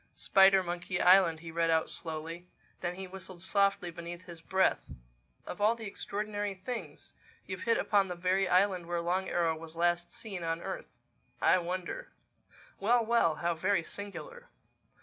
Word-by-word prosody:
"Spidermonkey 185 -2 +3
Island," 180 -3 +5
he 165 -1 -8
read 165 0 +1
out 160 -1 +2
slowly. 165 +2 -4 0.3
Then 175 0 -3
he 190 +1 -6
whistled 185 -1 -9
softly 195 -2 +1
beneath 170 +1 -8
his 170 -2 -10
breath. 190 +3 +1 0.6
"Of 180 - -7
all 215 +3 +4
the 225 -1 -8
extraordinary 205 0 -3
things! 230 +6 -7 0.3
You've 185 -1 -6
hit 230 - +4
upon 200 -2 +2
the 180 - -4
very 185 +2 +1
island 185 -1 +3
where 175 0 -1
Long 180 +3 -1
Arrow 165 -2 +1
was 160 0 -10
last 175 +1 +1
seen 200 -5 -5
on 165 0 -1
earth—I - - -2
wonder—Well, 200 - -3
well! 220 -9 +3
How 170 +2 0
very 185 +2 +1
singular!" 475 - -7
185 Hz, 150 wpm, -31 LUFS, 170-200 Hz, 0.6 s, Island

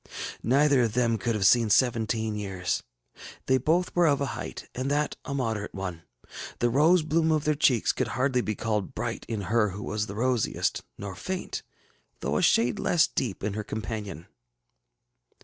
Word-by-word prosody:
Neither 140 +2 +4
of 115 -3 +1
them 115 -2 +1
could 115 -2 -1
have 100 -2 0
seen 115 +3 +5
seventeen 110 -2 +2
years. 95 -4 -2 0.6
They 130 0 +3
both 170 +7 +1
were 175 -1 +4
of 140 -2 +3
a 140 - 0
height, - - -7
and 130 +2 -2
that 150 +1 0
a 140 - -3
moderate 110 -7 -2
one. 90 -4 -5 0.6
The 120 0 +1
rose 160 +6 +4
bloom 160 +1 +2
of 155 -2 +2
their 150 - +2
cheeks 130 -6 +3
could 130 - -2
hardly 125 +2 +1
be 110 -2 -2
called 105 -3 -2
bright - - -4
in 110 -3 -2
her 105 +2 +2
who 100 +2 -7
was 105 0 -2
the 100 - -7
rosiest, 125 0 0 0.2
nor 100 -1 -6
faint, 185 - -4 0.6
though - - 0
a - - +1
shade 115 -1 +3
less 170 - +3
deep, 110 -8 -3
in 105 0 -1
her 105 +1 -3
companion. 105 -6 -5
115 Hz, 180 wpm, -27 LUFS, 105-140 Hz, 0.6 s, seen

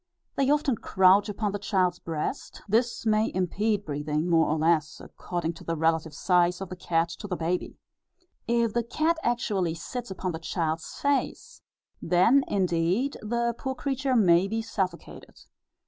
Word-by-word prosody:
They 275 -1 +1
often 290 -5 +2
crouch 190 +2 +4
upon 210 0 -2
the 205 - -4
child's 185 -3 0
breast; 165 - -5
this 235 +3 0
may 215 0 +2
impede 205 +3 0
breathing 150 +2 -2
more 165 -2 +3
or 155 - 0
less, 160 0 +1
according 170 -2 -4
to 165 - -13
the 165 - -2
relative 160 -1 0
size 180 +1 +2
of 190 -2 -6
the 185 - -6
cat 170 -1 0
to 205 - -6
the 185 - -2
baby. 175 +2 -2 0.7
If 235 -2 +1
the 235 - +1
cat 315 +8 0
actually 200 - 0
sits 240 +8 -6
upon 185 -1 -3
the 160 - -5
child's 165 -1 -3
face, 285 -1 -1 0.4
then 185 +11 +4
indeed 185 +7 0
the 235 +2 -1
poor 265 +2 -4
creature 270 -1 -1
may 185 -4 +4
be 225 +2 -2
suffocated. 190 -6 -5
190 Hz, 160 wpm, -27 LUFS, 170-235 Hz, 0.7 s, crouch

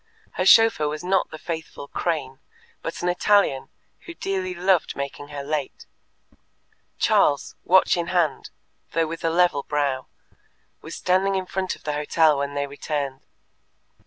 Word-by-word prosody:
Her - - -1
chauffeur 225 -9 +6
was 150 +2 -4
not 190 +1 +1
the - - -8
faithful 160 -3 -6
Crane, 145 -7 -3 0.4
but 165 - -5
an - - 0
Italian, 180 -6 +2 0.4
who 345 - -8
dearly 190 - -3
loved 180 -1 +1
making 140 +1 -5
her 145 -1 -6
late. 145 -1 -4 1.1
Charles, 145 -1 +2
watch 190 +1 +5
in 170 -1 -2
hand, 175 -4 0 0.4
though 165 0 +2
with 165 +1 -7
a 165 - +2
level 170 -3 +2
brow, 140 -3 -1 0.7
was - - -8
standing 190 +2 +1
in 190 -1 -1
front 185 +1 -3
of - - -21
the 150 - -2
hotel 150 0 +2
when 140 0 -3
they 140 0 0
returned. 140 -1 -4
160 Hz, 150 wpm, -24 LUFS, 145-180 Hz, 1.1 s, chauffeur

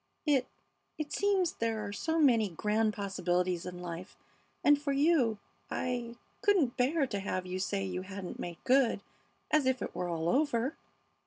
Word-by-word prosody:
"I 270 -4 +3 0.5
It 305 -1 -4
seems 390 -4 +2
there 225 -2 -1
are 200 - -5
so 320 +10 -1
many 235 -9 +4
grand 210 +5 +1
possibilities 180 -3 -1
in 180 0 -7
life, 175 +2 -7 0.5
and 290 0 +5
for 290 -1 -1
you 275 -6 +3 0.3
I 240 -2 -2 0.3
couldn't 360 -12 +3
bear 275 +4 +2
to 205 -6 -3
have 185 -1 -2
you 185 +1 -3
say 195 0 -1
you 185 -1 -3
hadn't 190 -1 -7
made 170 -1 -5
good, 255 -5 +3 0.5
as 305 -4 +4
if 260 -1 +2
it - - -4
were 180 - -3
all 165 -1 -1
over." 270 - +1
225 Hz, 165 wpm, -31 LUFS, 185-280 Hz, 0.5 s, and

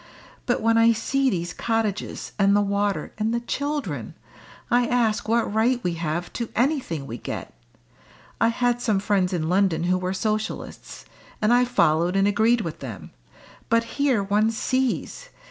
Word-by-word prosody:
But 245 - +1
when 230 +1 +3
I 230 0 +6
see 270 +4 +1
these 175 -5 -2
cottages, 225 -3 -2
and 200 0 +4
the 205 - +4
water, 200 0 -1
and 215 +1 0
the 235 - 0
children, 240 - -3 0.6
I 245 0 +3
ask 230 -4 +1
what 230 -2 +1
right 235 +3 +2
we 175 - 0
have 165 +1 -3
to 235 -2 -4
anything 245 - 0
we 120 -2 -7
get. - - -6 0.9
I 230 - +5
had 245 +1 +1
some 215 -5 +1
friends 195 -3 +1
in 165 -4 -1
London 180 -2 +2
who 180 +1 +1
were 185 +1 -2
Socialists, 215 +2 -4 0.3
and 215 +2 +3
I 245 +1 +5
followed 175 -7 +2
and 195 +1 +3
agreed 220 +3 +3
with 165 -6 -5
them, - - -8 0.6
but 230 0 +3
here 255 -2 0
one 205 +3 +2
sees! 260 - -2
215 Hz, 165 wpm, -24 LUFS, 185-240 Hz, 0.9 s, I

